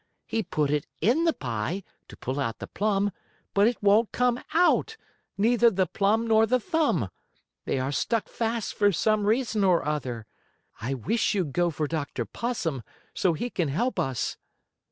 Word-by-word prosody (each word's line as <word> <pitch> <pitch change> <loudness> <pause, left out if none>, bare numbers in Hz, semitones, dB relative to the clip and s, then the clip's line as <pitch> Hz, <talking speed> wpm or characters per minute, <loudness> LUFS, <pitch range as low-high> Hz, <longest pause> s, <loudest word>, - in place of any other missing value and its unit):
He 225 - -1
put 150 -8 -1
it 150 -1 0
in 280 +10 +2
the 330 - +4
pie, 125 - -3 0.2
to - - -13
pull 130 +3 -3
out 115 -5 -2
the - - -6
plum, 205 -1 0 0.4
but 200 +2 +5
it 235 -3 -2
won't 210 +3 +4
come 250 0 +1
out 360 +6 +3 0.4
neither 235 +3 +4
the 190 -3 +1
plum 210 +5 +1
nor 225 -1 +4
the 255 +2 +3
thumb. 285 - 0 0.6
They - - 0
are 130 +1 -1
stuck 225 - 0
fast 230 -1 -2
for 205 -1 +3
some 210 +3 +1
reason 220 -2 +1
or 180 -5 +3
other. 130 -7 -3 0.6
I 130 +5 -2
wish 210 - 0
you'd 170 -9 -1
go 175 0 +2
for 155 -1 -2
Dr. 155 -2 -3
Possum, 180 - -3 0.3
so 180 -3 +2
he 240 +10 -3
can 175 -5 0
help 235 - -1
us." 130 -3 -1
200 Hz, 175 wpm, -27 LUFS, 150-230 Hz, 0.6 s, but